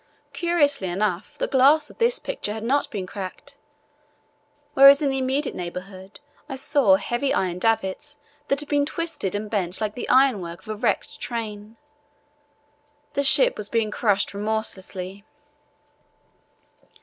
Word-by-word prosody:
Curiously 290 Hz, -, +1 dB
enough, 190 Hz, +8 st, -2 dB
the -, -, -1 dB
glass 290 Hz, +3 st, +4 dB
of -, -, -21 dB
this 480 Hz, +1 st, +2 dB
picture -, -, -4 dB
had 220 Hz, 0 st, -6 dB
not 275 Hz, +5 st, +1 dB
been 195 Hz, -4 st, -4 dB
cracked, 200 Hz, +10 st, -8 dB, 1.2 s
whereas 275 Hz, +1 st, +8 dB
in 280 Hz, -, +2 dB
the 270 Hz, -, -1 dB
immediate 265 Hz, +2 st, -1 dB
neighbourhood 185 Hz, +2 st, -8 dB, 0.3 s
I 270 Hz, -, -4 dB
saw 265 Hz, -6 st, +3 dB
heavy 240 Hz, +7 st, -1 dB
iron 180 Hz, -1 st, -1 dB
davits 225 Hz, +7 st, -1 dB, 0.3 s
that 275 Hz, +1 st, +1 dB
had 295 Hz, -, -9 dB
been 290 Hz, -1 st, +1 dB
twisted 325 Hz, -, -3 dB
and 210 Hz, +1 st, -3 dB
bent 190 Hz, -4 st, -2 dB
like 215 Hz, -1 st, -2 dB
the 245 Hz, -, -6 dB
ironwork 205 Hz, -11 st, +2 dB
of 220 Hz, -, -16 dB
a 215 Hz, -, -2 dB
wrecked 210 Hz, -, -1 dB
train. 220 Hz, -2 st, -6 dB, 1.4 s
The 280 Hz, -, +1 dB
ship -, -, +4 dB
was 210 Hz, -, -5 dB
being 225 Hz, -2 st, 0 dB
crushed 205 Hz, -4 st, +1 dB
remorselessly. 200 Hz, -2 st, -4 dB
220 Hz, 140 wpm, -24 LUFS, 195-280 Hz, 1.4 s, whereas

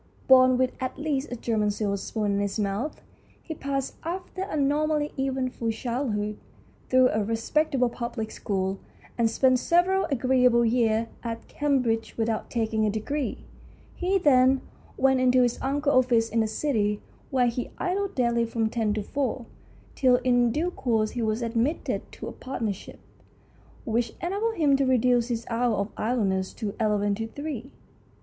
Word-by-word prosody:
Born 255 Hz, -1 st, +7 dB
with 255 Hz, 0 st, +2 dB
at 255 Hz, 0 st, -3 dB
least 295 Hz, -2 st, -2 dB
a -, -, -2 dB
German 220 Hz, -3 st, 0 dB
silver 205 Hz, -1 st, -1 dB
spoon 205 Hz, +1 st, -2 dB
in 200 Hz, -, +1 dB
his 200 Hz, 0 st, -1 dB
mouth, 210 Hz, +7 st, -2 dB, 0.4 s
he 320 Hz, -, -5 dB
passed, 275 Hz, -3 st, -3 dB
after 365 Hz, +3 st, -5 dB
a 385 Hz, -5 st, -3 dB
normally 295 Hz, +1 st, +1 dB
eventful 260 Hz, -3 st, -1 dB
childhood, 225 Hz, -3 st, -2 dB, 0.5 s
through 255 Hz, 0 st, +5 dB
a 215 Hz, 0 st, 0 dB
respectable 250 Hz, +5 st, +1 dB
public 235 Hz, -2 st, -4 dB
school, 190 Hz, -1 st, -2 dB, 0.4 s
and 230 Hz, -1 st, +2 dB
spent 255 Hz, +1 st, +3 dB
several 360 Hz, +6 st, +2 dB
agreeable 250 Hz, -2 st, +3 dB
years 225 Hz, -1 st, +2 dB, 0.2 s
at 230 Hz, -1 st, -5 dB
Cam 285 Hz, -3 st, +1 dB
bridge 225 Hz, -1 st, -2 dB
without 225 Hz, -1 st, -1 dB
taking 220 Hz, -2 st, 0 dB
a 215 Hz, -, +2 dB
degree. 255 Hz, +7 st, -3 dB, 0.5 s
He 380 Hz, +2 st, +1 dB
then 265 Hz, -5 st, +4 dB, 0.4 s
went 265 Hz, 0 st, +3 dB
into 255 Hz, 0 st, +4 dB
his 240 Hz, -1 st, -1 dB
uncle's 280 Hz, -2 st, +2 dB
office 230 Hz, -2 st, +2 dB
in 230 Hz, -, 0 dB
the 220 Hz, -, +2 dB
City, 215 Hz, -3 st, 0 dB, 0.3 s
where 255 Hz, -2 st, +2 dB
he 240 Hz, +1 st, -2 dB
idled 390 Hz, +2 st, -2 dB
daily 235 Hz, -2 st, +2 dB
from 225 Hz, -1 st, -1 dB
ten 220 Hz, -3 st, 0 dB
to 210 Hz, -, -2 dB
four, 260 Hz, -1 st, -2 dB, 0.5 s
till 255 Hz, -3 st, +4 dB
in 245 Hz, -2 st, +3 dB
due 335 Hz, +8 st, -1 dB
course 225 Hz, -8 st, 0 dB
he 245 Hz, -, -3 dB
was 220 Hz, +1 st, 0 dB
admitted 230 Hz, +7 st, -1 dB
to -, -, -7 dB
a -, -, -5 dB
partnership, 225 Hz, -7 st, -5 dB, 0.9 s
which 230 Hz, -1 st, 0 dB
enabled 410 Hz, +6 st, -1 dB
him 290 Hz, -4 st, +3 dB
to 275 Hz, -, +2 dB
reduce 250 Hz, -2 st, +3 dB
his 235 Hz, -2 st, -3 dB
hours 235 Hz, 0 st, +1 dB
of 200 Hz, +2 st, -2 dB
idleness 200 Hz, -5 st, 0 dB
to 205 Hz, -2 st, -4 dB
eleven 205 Hz, -2 st, +1 dB
to 225 Hz, +2 st, -3 dB
three. 280 Hz, 0 st, -6 dB
245 Hz, 160 wpm, -26 LUFS, 220-275 Hz, 0.9 s, Born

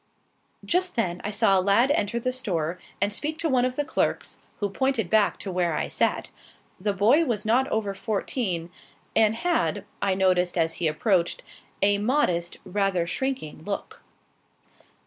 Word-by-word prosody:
Just 360 Hz, +1 st, 0 dB
then 180 Hz, -7 st, -1 dB
I -, -, -2 dB
saw 205 Hz, -2 st, +3 dB
a -, -, +2 dB
lad 200 Hz, +8 st, +3 dB
enter 235 Hz, -4 st, 0 dB
the 255 Hz, +2 st, -1 dB
store 180 Hz, -9 st, -2 dB, 0.2 s
and 205 Hz, +1 st, +1 dB
speak 305 Hz, +7 st, -3 dB
to 330 Hz, -, -1 dB
one 255 Hz, -4 st, +3 dB
of 255 Hz, 0 st, -2 dB
the 290 Hz, -, -1 dB
clerks, -, -, -1 dB, 0.2 s
who 205 Hz, -, 0 dB
pointed 230 Hz, -2 st, -1 dB
back 215 Hz, -2 st, +3 dB
to 195 Hz, -, -5 dB
where 175 Hz, -3 st, 0 dB
I -, -, -1 dB
sat. -, -, 0 dB, 0.5 s
The 205 Hz, +3 st, 0 dB
boy 220 Hz, -, +4 dB
was 230 Hz, -7 st, -2 dB
not 250 Hz, +5 st, +3 dB
over 215 Hz, -6 st, -1 dB
fourteen, 195 Hz, -4 st, -2 dB, 0.4 s
and 220 Hz, 0 st, +4 dB
had, 345 Hz, +7 st, 0 dB, 0.2 s
I 195 Hz, -1 st, +1 dB
noticed 185 Hz, -2 st, +2 dB
as 165 Hz, -1 st, +2 dB
he 165 Hz, -, +3 dB
approached, 170 Hz, +2 st, +1 dB, 0.4 s
a 200 Hz, 0 st, +4 dB
modest, 205 Hz, -8 st, 0 dB
rather 190 Hz, -2 st, 0 dB
shrinking 255 Hz, -, -3 dB
look. 200 Hz, +2 st, -5 dB
205 Hz, 165 wpm, -26 LUFS, 180-250 Hz, 0.5 s, boy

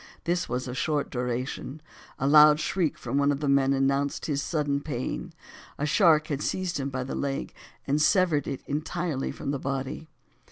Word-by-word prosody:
This 175 Hz, +1 st, -1 dB
was 125 Hz, +2 st, -2 dB
of 125 Hz, -, -5 dB
short 150 Hz, +1 st, -1 dB
duration, 125 Hz, +3 st, -3 dB, 0.4 s
a 135 Hz, -, 0 dB
loud 150 Hz, +1 st, +7 dB
shriek 165 Hz, 0 st, 0 dB
from 130 Hz, +3 st, -2 dB
one 140 Hz, 0 st, +3 dB
of 140 Hz, -, -2 dB
the 150 Hz, -, -2 dB
men 140 Hz, -1 st, +3 dB
announced 140 Hz, +1 st, 0 dB
his 145 Hz, -2 st, -1 dB
sudden 145 Hz, -3 st, -1 dB
pain; 130 Hz, -4 st, -4 dB, 0.5 s
a 145 Hz, -, -1 dB
shark 155 Hz, -2 st, +4 dB
had 145 Hz, -1 st, -2 dB
seized 185 Hz, -3 st, -2 dB
him 135 Hz, 0 st, -2 dB
by 130 Hz, -1 st, -3 dB
the 130 Hz, -, -5 dB
leg, 140 Hz, -1 st, -3 dB, 0.3 s
and 145 Hz, +2 st, +1 dB
severed 160 Hz, -4 st, +3 dB
it 135 Hz, -, -4 dB
entirely 155 Hz, 0 st, -2 dB
from 140 Hz, -, -4 dB
the 140 Hz, -, -2 dB
body. 135 Hz, +3 st, -4 dB
140 Hz, 185 wpm, -27 LUFS, 135-155 Hz, 0.5 s, loud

